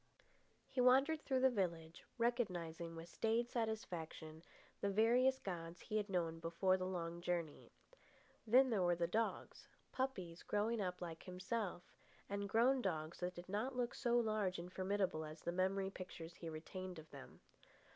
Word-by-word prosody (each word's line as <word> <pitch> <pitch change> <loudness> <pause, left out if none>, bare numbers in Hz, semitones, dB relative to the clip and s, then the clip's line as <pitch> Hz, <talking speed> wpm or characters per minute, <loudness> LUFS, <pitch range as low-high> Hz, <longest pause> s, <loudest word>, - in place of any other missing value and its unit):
He 255 - 0
wandered 270 +5 +5
through 260 -2 +1
the 265 0 +6
village, 170 -6 -2
recognising 175 -9 -1
with 165 +1 -7
staid 230 +6 0
satisfaction 170 -8 -3 0.4
the 200 - +1
various 240 +6 +4
gods 175 -5 -5
he 215 - -2
had 210 -1 -1
known 165 -3 0
before 170 +3 +2
the 185 0 -2
long 170 -2 -3
journey. 170 -4 -2 0.8
Then 255 +3 +6
there 210 -4 +2
were 175 -1 +4
the 170 0 +1
dogs, 220 +7 -1 0.2
puppies 190 -11 -2
growing 215 +2 0
up 180 -2 -2
like 165 -2 -6
himself, 185 0 -3 0.4
and 200 0 -2
grown 250 +5 +4
dogs 160 -5 -2
that 180 0 -2
did 175 +1 -8
not 215 +7 -1
look 245 -1 0
so 240 -2 +2
large 215 -5 +1
and 175 +1 -7
formidable 190 -4 0
as 155 +1 -8
the 170 - 0
memory 190 +2 +1
pictures 175 -3 -7
he 165 - -5
retained 180 +3 -6
of 160 0 -9
them. 140 -2 -11
185 Hz, 160 wpm, -40 LUFS, 170-225 Hz, 0.8 s, the